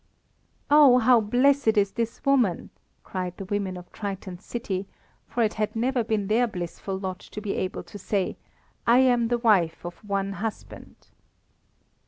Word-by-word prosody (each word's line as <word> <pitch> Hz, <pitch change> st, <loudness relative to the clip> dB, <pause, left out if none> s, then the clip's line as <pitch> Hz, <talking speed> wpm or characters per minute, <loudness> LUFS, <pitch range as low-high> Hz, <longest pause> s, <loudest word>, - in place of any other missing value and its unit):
"Oh, 290 Hz, -4 st, +8 dB
how 245 Hz, -1 st, +5 dB
blessed 245 Hz, +1 st, +3 dB
is 200 Hz, -1 st, +3 dB
this 230 Hz, -1 st, -4 dB
woman!" 250 Hz, -10 st, +2 dB, 0.3 s
cried 180 Hz, -2 st, -5 dB
the 195 Hz, -, -6 dB
women 195 Hz, -2 st, -2 dB
of 180 Hz, 0 st, -12 dB
Triton's 195 Hz, -2 st, -6 dB
city, 195 Hz, -5 st, -4 dB, 0.4 s
for 240 Hz, -, 0 dB
it 215 Hz, -, +1 dB
had 215 Hz, 0 st, -2 dB
never 245 Hz, +2 st, +1 dB
been 215 Hz, -2 st, -1 dB
their 230 Hz, +4 st, +2 dB
blissful 185 Hz, 0 st, -5 dB
lot 190 Hz, -1 st, -5 dB
to -, -, -9 dB
be 205 Hz, -1 st, -3 dB
able 185 Hz, -, -3 dB
to 205 Hz, -, -11 dB
say: 195 Hz, 0 st, -1 dB, 0.5 s
"I 235 Hz, +1 st, +6 dB
am 245 Hz, -3 st, +4 dB
the 240 Hz, +1 st, +1 dB
wife 195 Hz, -9 st, +2 dB
of 175 Hz, -, -6 dB
one 200 Hz, -1 st, -2 dB
husband." 215 Hz, +2 st, -7 dB
210 Hz, 160 wpm, -25 LUFS, 190-240 Hz, 0.5 s, Oh